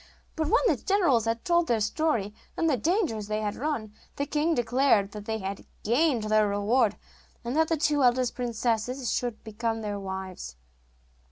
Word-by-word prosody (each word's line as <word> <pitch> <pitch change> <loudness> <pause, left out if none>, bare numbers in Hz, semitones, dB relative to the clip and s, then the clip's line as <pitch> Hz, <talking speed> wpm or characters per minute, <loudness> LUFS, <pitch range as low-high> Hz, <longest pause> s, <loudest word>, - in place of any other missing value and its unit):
But 315 -1 -1
when 465 +10 +3
the - - +3
generals 340 - +2
had 230 0 -2
told 345 -1 +3
their 235 -2 +2
story, 215 -2 0 0.2
and 330 - +1
the 300 - +3
dangers 275 - 0
they 215 0 -1
had 205 -1 -2
run, 240 -7 -3 0.2
the 285 - -1
king 305 +3 +1
declared 240 -4 +2
that 210 -1 -8
they 220 0 -2
had 195 -1 -5 0.2
gained 245 +1 +2
their 215 0 +3
reward, 205 +2 +2 0.5
and 240 +3 -2
that 320 +1 +3
the 325 - +1
two 295 -1 +2
eldest 250 -1 +3
princesses 240 +1 -1
should 240 -3 -3
become 225 +1 -3
their 205 -1 -3
wives. 190 - -6
235 Hz, 175 wpm, -27 LUFS, 215-295 Hz, 0.5 s, when